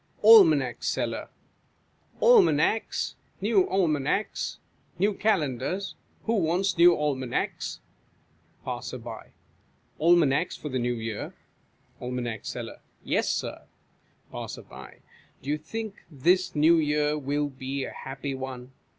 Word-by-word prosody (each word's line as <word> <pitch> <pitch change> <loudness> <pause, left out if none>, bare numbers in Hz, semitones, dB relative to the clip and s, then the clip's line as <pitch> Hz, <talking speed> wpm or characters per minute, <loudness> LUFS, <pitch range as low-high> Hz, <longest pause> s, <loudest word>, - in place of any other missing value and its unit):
Almanac 160 - +7
Seller. - - -2 0.9
Almanacs! 365 - +3 0.3
New 200 -2 +2
Almanacs! 170 0 0 0.4
New 200 +4 +2
Calendars! 185 - -1 0.3
Who 230 0 +1
wants 185 +2 +1
new 170 0 +7
Almanacs? 135 -4 -2 0.8
Passer - - -4
ly. - - -10 0.7
Almanacs 165 -1 +3
for 150 - -6
the 130 -1 -1
New 120 0 0
Year? 110 -2 -5 0.7
Aim. 125 -1 -3
Seller. - - -7 0.2
Yes, - - 0
Sir. - - -3 0.6
Passer. - - -7 0.8
Do 135 - -6
you 150 - -1
think 215 +6 -6
this 175 +5 +1
New 160 +3 +5
Year 150 -1 +1
will 145 0 -1
be 135 0 -4
a - - -5
happy 135 +1 -6
one 130 -1 -7
150 Hz, 105 wpm, -27 LUFS, 135-185 Hz, 0.9 s, Almanac